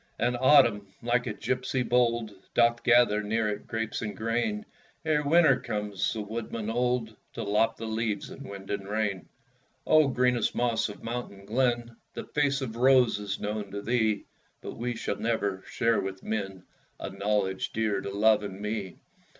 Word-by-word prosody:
And 120 +2 +1
Autumn, 120 -6 +5 0.2
like 120 +1 +1
a 105 - -2
gipsy 130 0 -1
bold, 120 -2 +1 0.2
Doth 120 0 +4
gather 120 -3 +5
near 110 +1 0
it 105 0 -5
grapes 110 -1 -3
and 105 -3 -4
grain, 120 - -1 0.4
Ere 155 -2 +2
Winter 150 -2 +5
comes, 105 -2 -2
the 110 - -3
woodman 110 +1 -4
old, 120 -2 0 0.2
To - - -4
lop 105 +2 +2
the 115 - -7
leaves 110 -2 -2
in - - -9
wind 100 -1 -8
and 100 -1 -3
rain. 105 -3 -2 0.6
O, 155 -2 +5
greenest 125 -2 +1
moss 120 -2 +1
of 105 - -10
mountain 115 -4 -5
glen, 120 0 0 0.2
The - - -4
face 140 -2 0
of 115 -3 -4
Rose 125 -3 +5
is 100 -1 -4
known 105 -1 -3
to 100 +1 -6
thee; 110 -4 +1 0.3
But - - -7
we 120 +1 -3
shall - - -3
never 100 -5 -1
share 115 -1 +2
with 95 0 -6
men 95 -4 -3 0.4
A - - -5
knowledge 100 -2 -1
dear 110 -3 0
to - - -5
love 105 +2 +4
and 100 -2 -6
me! 105 -3 -4
110 Hz, 170 wpm, -28 LUFS, 105-120 Hz, 0.6 s, Autumn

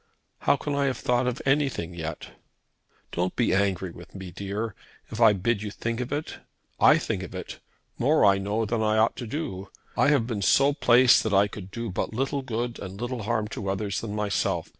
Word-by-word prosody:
"How - - +3
can 145 +1 -4
I 140 0 +1
have 130 -3 0
thought 125 +1 +1
of 125 +1 -3
anything 135 - +1
yet?" 80 -2 -6 0.8
"Don't 90 +1 -1
be 120 - +2
angry 95 -2 0
with 85 +3 -13
me, 95 -2 -7
dear, 100 +4 -4 0.4
if 110 - -4
I 110 -2 +8
bid 105 +2 0
you 105 - -4
think 115 +3 -4
of 125 0 -4
it. 145 +2 -3 0.4
I - - +7
think - - -2
of - - -8
it, - - -7 0.4
more 145 0 +4
I 100 -1 +5
know 105 +3 -1
than 110 +1 -1
I 110 0 +2
ought 110 +1 +3
to 120 - -5
do. 100 - -5 0.3
I - - +3
have 140 -6 +3
been 115 -4 -3
so 140 +8 +4
placed 125 -3 +5
that 110 -3 0
I 100 +1 +5
could 100 -2 -9
do 115 +1 -5
but 100 - -3
little 135 +2 -1
good 120 -1 -3
and 95 0 -8
little 120 0 -3
harm 105 0 -1
to 100 -2 -4
others 100 0 -2
than 105 -2 -5
myself. 105 -1 -1
110 Hz, 210 wpm, -26 LUFS, 100-125 Hz, 0.8 s, I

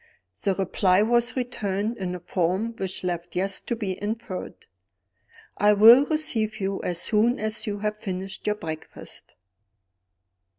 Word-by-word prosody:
The 195 -2 +1
reply 190 0 +2
was 240 +2 +2
returned 220 -3 -2
in 180 -1 -3
a - - -6
form 185 +6 -1
which 190 -1 -4
left 175 -1 -4
Yes 190 +2 -1
to 235 - -3
be 200 -5 -4
inferred: 210 -3 -5 0.9
"I 210 +1 +5
will 230 +6 +8
receive 225 -9 -1
you 195 0 -2
as 175 -1 -2
soon 230 +3 +2
as 215 +1 -2
you 205 -1 -2
have 210 0 -1
finished 190 -1 -6
your 210 - +2
breakfast." 160 -5 -9
205 Hz, 140 wpm, -25 LUFS, 185-225 Hz, 0.9 s, will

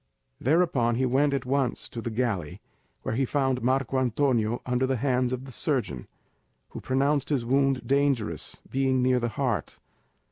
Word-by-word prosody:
Thereupon 135 -6 +2
he 130 +2 +1
went 135 +3 +2
at 140 -2 -1
once 135 0 -1
to 115 - -6
the 115 - -3
galley, 105 -7 -2 0.4
where - - -2
he 130 +4 +1
found 135 -1 0
Marco 130 +1 +1
Antonio 120 -2 +1
under 125 +1 +1
the 135 - +1
hands 125 0 +1
of 130 +1 -4
the 135 - -9
surgeon, 120 - -2 0.6
who - - -8
pronounced 140 +2 +1
his 135 -6 0
wound 135 +1 +2
dangerous, 135 - 0
being 130 -1 +1
near 130 0 +3
the 120 0 -1
heart. - - -2
130 Hz, 165 wpm, -27 LUFS, 120-135 Hz, 0.6 s, near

